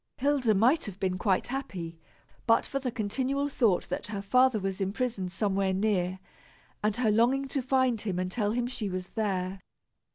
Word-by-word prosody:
Hilda 270 -5 +2
might 250 +11 +4
have 195 -2 -8
been 185 -1 -1
quite 190 +2 +1
happy 185 -12 -5 0.5
but 230 - +4
for 275 - -2
the 260 -2 -2
continual 255 +5 -1
thought 230 -9 +2
that - - -3
her 205 -2 -4
father 250 +2 +4
was 195 0 -3
imprisoned 195 -2 -2
somewhere 195 0 0
near, 190 -2 0 0.7
and 210 -1 +2
her 230 -3 +2
longing 250 +5 +3
to 275 - -1
find 255 -3 +2
him 195 -5 -2
and 185 0 -2
tell 210 -2 0
him 240 0 0
she 245 -5 -4
was 185 0 -4
there. 190 -3 -2
215 Hz, 175 wpm, -29 LUFS, 190-255 Hz, 0.7 s, might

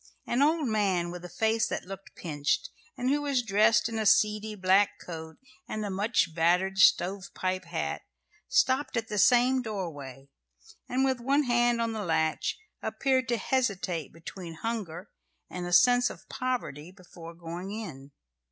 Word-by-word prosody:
An 245 - 0
old 305 0 +3
man, 195 -6 +1
with 175 0 -8
a 180 - -8
face 220 +3 +1
that - - -4
looked 195 +1 -10
pinched, 155 -1 -2 0.3
and 250 +2 0
who 290 +1 +1
was 280 -4 0
dressed 215 +1 +3
in 225 -1 -3
a 215 - -1
seedy 210 +1 +3
black 190 +1 +3
coat 160 -2 -8 0.3
and 215 -1 -3
a 200 - -3
much 200 -3 +1
battered 180 +4 +2
stovepipe 185 0 +2
hat, - - -3 0.5
stopped 265 - +2
at 225 -1 -2
the 210 - -1
same 250 +5 +5
doorway, 145 - -6 0.6
and, 260 +2 +1
with 260 -2 0
one 275 +5 +2
hand 240 -1 +2
on 230 -1 0
the 215 -1 -3
latch, 160 -3 0 0.2
appeared 260 -1 0
to 240 -1 +1
hesitate 195 - -1
between 165 +1 -9
hunger 195 -3 -5 0.4
and 180 -1 -4
a - - -5
sense 245 +5 +5
of - - -12
poverty 240 - -3
before 175 -3 -12
going 170 +2 -7
in. 160 -11 -7
205 Hz, 160 wpm, -28 LUFS, 175-240 Hz, 0.6 s, same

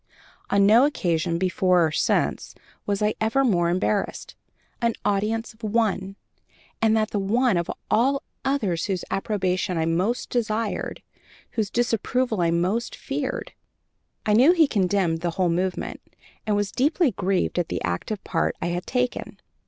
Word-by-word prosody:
On 200 0 +4
no 230 +7 +6
occasion, 170 - 0
before 185 -1 +2
or 160 - -1
since, - - 0 0.3
was 205 +1 0
I 210 0 +2
ever 225 +5 +2
more 175 -7 +2
embarrassed 190 +3 -1 0.5
an 235 -1 +1
audience 215 +3 0
of 220 - -26
one, 205 -3 0 0.7
and 220 0 +4
that 215 0 0
the 205 - 0
one 230 +3 +2
of 170 -1 -1 0.2
all 270 +5 +2 0.2
others 210 -12 0
whose 190 -3 -2
approbation 190 -2 -1
I 160 - +1
most 185 +9 -1
desired, 225 -2 -2 0.5
whose 215 -3 -1
disapproval 240 -1 0
I 170 - +2
most 180 +8 0
feared. - - -4 0.7
I 210 - +2
knew 260 +10 +6
he 335 -3 +5
condemned 185 -6 +1
the 175 - 0
whole 185 -2 +2
movement, 180 +2 -2 0.5
and 210 - +2
was 205 -1 0
deeply 295 +2 +2
grieved 190 -2 0
at 175 - -1
the - - -3
active 90 - -3
part 165 - 0
I - - -2
had 175 +1 -3
taken. 250 -1 -2
205 Hz, 150 wpm, -24 LUFS, 180-230 Hz, 0.7 s, no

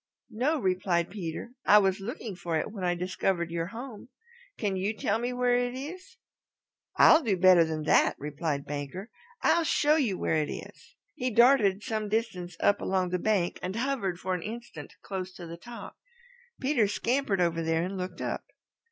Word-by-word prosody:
"No," 260 +9 +1
replied 185 -4 0
Peter. 180 +2 -5
"I 210 - +7
was 195 -2 +3
looking 215 0 -6
for 170 -2 -2
it - - -3
when 200 -4 -7
I 175 -1 +1
discovered 180 -1 -1
your 165 0 -2
home. 235 +1 -9 0.5
Can 200 -3 -1
you 200 +4 -2
tell 210 +3 0
me 245 +1 -2
where 250 0 +1
it 245 0 0
is?" 310 +8 -8 0.8
"I'll 320 - +7
do 215 - 0
better 180 -1 +7
than 160 -1 -3
that;" 155 - +4
replied 145 0 -3
Banker. 145 - -6 0.3
"I'll 340 - +4
show 300 0 +3
you 230 -11 0
where 160 - 0
it 150 - -3
is." - - -9 0.2
He 255 +5 -2
darted 230 -4 +4
some 215 -1 -2
distance 185 -6 -2
up 205 - +3
along 185 -1 0
the 180 0 -1
bank 195 -3 0
and 185 +2 -4
hovered 230 -8 -1
for 185 0 -2
an 180 - -2
instant 215 -8 -8
close 190 -1 -5
to 175 - -9
the 165 0 -7
top. 235 +7 -10 0.6
Peter 260 -6 +2
scampered 230 -1 0
over 170 -1 +1
there 165 0 +1
and 185 +2 -4
looked 180 -1 -5
up. - - -3
195 Hz, 180 wpm, -28 LUFS, 175-235 Hz, 0.8 s, I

